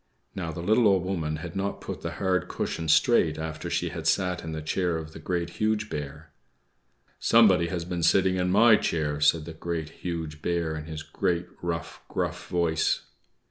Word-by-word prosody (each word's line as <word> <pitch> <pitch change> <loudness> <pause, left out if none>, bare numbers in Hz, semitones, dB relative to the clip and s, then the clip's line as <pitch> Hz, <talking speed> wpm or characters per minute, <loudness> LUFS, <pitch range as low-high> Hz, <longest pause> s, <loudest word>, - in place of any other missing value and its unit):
Now, 85 -4 -4
the 85 +2 -6
little 110 +4 +4
Old 95 -3 +3
Woman 85 -5 -2
had 80 +2 -7
not 100 +1 -2
put - - -6
the - - -4
hard 95 -1 0
cushion 80 - -3
straight 80 -2 +4
after 80 -1 -5
she - - 0
had - - -5
sat 90 -2 +1
in 80 - -5
the 80 -1 -5
chair 85 +1 0
of 80 0 -7
the - - -9
Great, 85 +1 -2
Huge 110 0 +1
Bear. 75 0 -6 0.9
"=Somebody 95 -7 +5
has 85 0 -3
been 90 -1 -3
sitting 95 +2 +3
in 90 0 +1
my 110 +3 +6
chair!=" 75 -5 -1
said 75 +1 +4
the 80 - -7
Great, 80 -1 -4
Huge 80 -4 -4
Bear, 85 -2 -1
in 75 0 -6
his 80 -1 -6
great, 85 +1 -1 0.2
rough, 85 0 -4
gruff - - -3
voice. 85 -3 +1
85 Hz, 185 wpm, -27 LUFS, 80-90 Hz, 0.9 s, my